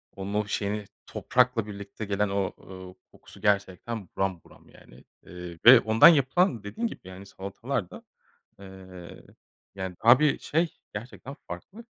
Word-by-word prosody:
onun, 100 +1 -6
o 105 0 0
şeyini, 105 0 -2 0.2
toprakla 125 -3 +1
birlikte 100 +1 -8
gelen 100 0 0
o, 100 -2 -1
ııı, 95 -1 -11 0.2
kokusu, - - -17
gerçekten, 100 0 -1
buram 95 -4 -1
buram, - - -20
yani, - - -18 0.2
eee, 90 -1 -9
ve 125 0 +11
ondan 110 +1 +6
yapılan, 145 - +3
dediğin 225 - -3
gibi, - - -9
yani, 95 +1 -11
salatalar 100 +2 -5
da, - - -12 0.6
eee, 95 -2 -12 0.5
yani, 95 -2 -6
daha 120 +2 +8
bir 150 -2 +2
şey, 165 +2 -1 0.2
gerçekten 125 +5 -8
farklı. 225 +4 -9
100 Hz, 145 wpm, -27 LUFS, 95-120 Hz, 0.6 s, ve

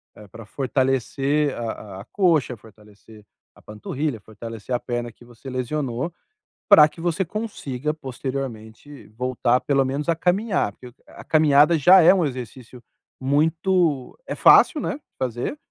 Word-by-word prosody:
eh, 105 - -14
pra 115 +3 -12
fortalecer 135 +3 -1
a 110 -4 -6
a - - -13
coxa, 165 - +1
fortalecer 105 0 -18 0.3
a - - -20
panturrilha, 120 +5 -5
fortalecer 115 +2 -8
a 120 - +1
perna 120 -1 -4
que 120 - -20
você 120 +2 -12
lesionou, 130 +3 -3 0.5
pra 155 -8 +8
que 165 - -17
você 175 +2 0
consiga 155 - -4
posteriormente 130 -2 -7
voltar 125 +2 0
pelo 135 -2 +1
menos 140 +5 -3
a 165 - +3
caminhar. 185 - 0
Porque, 125 +4 -14 0.2
a - - -13
caminhada 155 +1 +4
já 180 +6 +7
é 165 - +7
um 180 -4 +1
exercício 125 -2 -8 0.4
muito 160 +1 0
é - - -5
fácil, 305 - +5
né, - - -2
de 295 - -13 0.2
fazer, 125 - -3
135 Hz, 145 wpm, -22 LUFS, 120-155 Hz, 0.5 s, pra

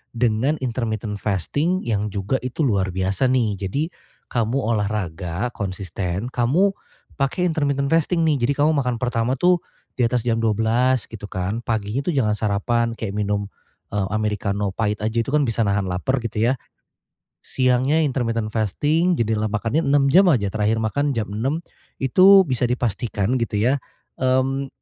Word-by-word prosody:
dengan 120 +5 +1
intermittent 110 -4 -2
fasting 145 - -1
yang 105 -2 -1
juga 100 +6 -1
itu 130 +5 -3
luar 95 -8 +1
biasa 95 +5 0
nih. 115 -6 +1
Jadi 145 - -1 0.4
kamu 115 +1 0
olahraga 100 -3 -2
konsisten, 95 0 -4
kamu 155 +12 +2 0.5
pakai 140 +7 0
intermittent 140 -4 0
fasting 165 +1 +2
nih. 150 -3 +2
Jadi 140 - +2
kamu 155 - +4
makan 125 -2 0
pertama 120 +1 0
tuh 175 +5 +3 0.4
di 125 - +1
atas 120 0 0
jam 115 - +3
12.00 115 +3 +1
gitu 110 -2 -11
kan. 95 +6 -3
Paginya 110 +4 -2
tuh 175 - 0
jangan 110 -8 +1
sarapan 115 +3 0
kayak 110 -3 -5
minum, 105 -1 -1 0.5
eee, 95 -2 0
amerikano 105 -2 -1
pait 105 -2 -1
aja, 110 +2 -2
itu 135 - -6
kan 145 -3 +2
bisa 115 0 0
nahan 100 -2 0
laper 110 +9 -1
gitu 115 -1 -2
ya. 130 - -3 0.8
Siangnya 130 +5 +1
intermittent 115 -5 -1
fasting, 150 - +1
jendela 110 -4 0
makannya 115 +7 0
6 140 -1 +3
jam 190 +2 +6
aja. 110 - +2
Terakhir 110 +1 0
makan 140 +5 0
jam 105 -3 -2
6.00 135 +10 -2 0.4
itu 190 +8 +7
bisa 125 -5 0
dipastikan 120 -1 -1
gitu 115 -2 -2
ya, 125 +7 +2 0.4
mmm, 130 +1 +1
115 Hz, 155 wpm, -22 LUFS, 105-135 Hz, 0.8 s, itu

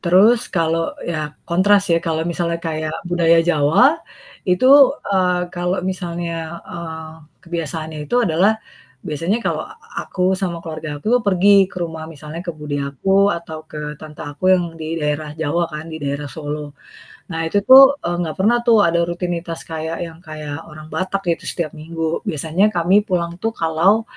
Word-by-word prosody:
Terus 195 +7 +5
kalau 165 -2 0
ya 165 - -2 0.3
kontras 195 +4 +4
ya, 165 - +4
kalau 160 -1 0
misalnya 170 0 -1
kayak 155 -1 -3 0.2
budaya 170 -1 +4
Jawa, 175 - +4 0.5
itu, 180 +8 +3 0.5
eee, 180 -2 +2
kalau 180 +1 -1
misalnya, 170 -2 -4
eee, 160 -2 -6 0.3
kebiasaannya 160 -2 -4
itu 240 - 0
adalah, 185 +3 +3 0.6
biasanya 165 +8 0
kalau - - -1
a 430 - -13
a 455 - -8
aku 185 - -4 0.2
sama 180 -4 -2
keluarga 160 -1 -6
aku 145 - -15
tuh - - -7
pergi 200 +1 +5
ke - - -15
rumah 160 -1 -5
misalnya 155 0 -9
ke - - -1
bude 150 -1 -4
aku, 140 +8 -4 0.3
atau 165 -2 -7
ke 150 - -7 0.2
tante 155 -1 -9
aku 145 +4 -8
yang 180 -1 +1 0.2
di 160 +1 -3
daerah 150 0 -1
Jawa 160 +2 0
kan, 150 +1 -5
di - - -4
daerah 140 +1 -3
Solo. 150 0 -6 0.6
Nah 165 -2 -3
itu 185 +5 +1
tuh, 265 +1 +11 0.2
eee, 175 - -1
nggak 160 -3 -2
pernah 215 +6 +4
tuh 230 -2 +6
ada 170 0 +2
rutinitas 175 -1 -3
kayak 160 +1 -4
yang 165 -1 -12
kayak 155 0 -7
orang 155 0 -11
Batak 190 +1 -1
gitu 165 - -2
setiap 170 -4 -3
minggu. 165 +1 -3
Biasanya 160 +2 0
kami 180 +4 +4
pulang 170 -3 -1
tuh 225 - 0
kalau 170 +6 +2
165 Hz, 170 wpm, -20 LUFS, 155-180 Hz, 0.6 s, tuh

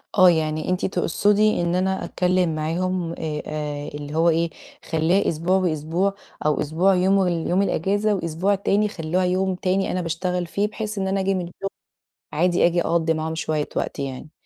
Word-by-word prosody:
آه، 185 -2 +8
يعني 155 -1 0
أنتِ 180 0 0
تقصدي 205 +3 +2
إن 175 0 0
أنا 190 +1 0
أتكلم 180 -2 +1
معاهم 170 +2 -1
آآ، 155 -3 -4
آآ، 150 -1 -4
اللي 145 0 -7
هو 165 +1 +4
إيه 165 +1 +1 0.4
خليها 165 +5 +2
أسبوع 170 +4 +1
وأسبوع، 175 +2 0 0.3
أو 150 -1 +2
أسبوع 170 +6 +2
يوم 190 +1 +3
اليوم 175 +2 +1
الإجازة 200 +3 +1
وأسبوع 180 +3 0
تاني 200 +2 +1
خلوها 180 -2 -1
يوم 185 +1 +1
تاني 185 +1 0
أنا 185 - -1
باشتغل 180 +2 -2
فيه، 200 +5 -1
بحيث 215 0 -5
إن 190 -1 -1
أنا 195 +1 0
آجي 195 0 +1
من 185 - -1
الشغل 195 +3 -6 0.6
عادي 175 +3 +3
آجي 175 0 +2
أقضي 165 -1 +1
معاهم 160 0 -3
شوية 155 -2 -2
وقت - - -2
يعني. 140 +2 -5
175 Hz, 175 wpm, -23 LUFS, 160-190 Hz, 0.6 s, آه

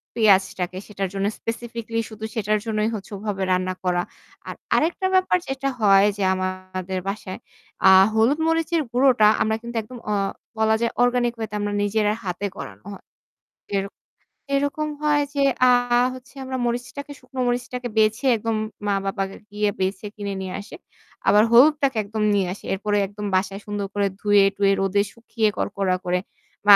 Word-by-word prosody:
পেঁয়াজটাকে 190 -4 +2
সেটার 195 -2 -3
জন্য 195 0 -1
স্পেসিফিকালি 230 0 -4
শুধু 220 0 -7
সেটার 215 -1 +1
জন্যই 215 0 0
হচ্ছে 200 -1 -8
ওভাবে 200 -1 -3
রান্না 185 0 +1
করা। 180 -1 +1 0.5
আর - - -5 0.2
আরেকটা 345 +4 +1
ব্যাপার 370 -1 +4
যেটা 270 0 -2
হয় 200 -1 +6
যে 200 - -1
আমাদের 185 0 -4
বাসায় 195 -1 -5 0.5
আ - - +10 0.2
হলুদ 230 +7 +3
মরিচের 325 0 +1
গুঁড়োটা 250 -4 +5
আমরা 220 0 +2
কিন্তু 235 0 -8
একদম 245 +4 -11
অ - - +2 0.4
বলা 220 0 +3
যায় 235 - +1
অর্গানিক 245 -1 +2
ওয়ে 220 -1 -3
তে - - -4
আমরা 205 0 -2
নিজেরা 210 0 +1
হাতে 185 +1 -3
করানো - - -9
হয়। 195 - -13 0.7
এরক 195 +1 -3 0.6
এরকম 285 +2 -1
হয় 295 -1 +3
যে 280 - +1 0.3
আ - - +7 0.4
হচ্ছে 255 +1 -13
আমরা 260 0 -4
মরিচটাকে 245 +4 -4
শুকনো 255 +1 -7
মরিচটাকে 245 0 -2
বেছে 220 +4 +2
একদম 225 +1 -2 0.3
মা 205 - +2
বাবাকে 195 0 -2
গিয়ে 210 0 0
বেছে 190 +2 -1
কিনে 200 -1 -4
নিয়ে 185 -1 -5
আসে। 205 - -10 0.5
আবার 210 - +6
হলুদটাকে 275 +1 +5
একদম 215 +1 -3
নিয়ে 195 -2 +2
আসে। 200 - -10
এরপরে 205 +2 -1
একদম 205 +1 -7
বাসায় 195 +1 0
সুন্দর 205 -1 -3
করে 205 -1 +1
ধুয়ে 205 -1 +5
টুয়ে 195 0 +3
রোদে 195 +1 +2
শুকিয়ে 230 -1 -1
কড়কড়া 195 -2 0
করে 180 0 +1 0.5
বা 205 - +10
210 Hz, 165 wpm, -23 LUFS, 195-245 Hz, 0.7 s, আ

